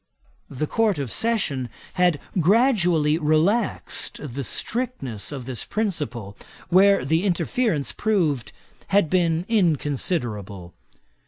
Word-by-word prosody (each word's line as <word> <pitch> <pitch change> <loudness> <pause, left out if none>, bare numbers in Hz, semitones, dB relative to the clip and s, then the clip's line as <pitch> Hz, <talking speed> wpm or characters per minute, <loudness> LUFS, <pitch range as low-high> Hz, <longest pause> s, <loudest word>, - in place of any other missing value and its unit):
The 140 +3 -3
Court 215 +2 +1
of 135 -5 -3
Session 175 - 0 0.2
had 180 -5 +2 0.2
gradually 175 - +3
relaxed 170 +9 0
the 140 +2 -3
strictness 150 - -3
of 135 -4 -6
this 130 -2 -3
principle, 135 - -3 0.3
where 195 -3 +5
the 160 +5 +1
interference 200 - 0
proved 170 - 0 0.4
had 195 -6 +2
been 170 -2 +1
inconsiderable. 130 - -1
165 Hz, 100 wpm, -23 LUFS, 135-200 Hz, 0.4 s, where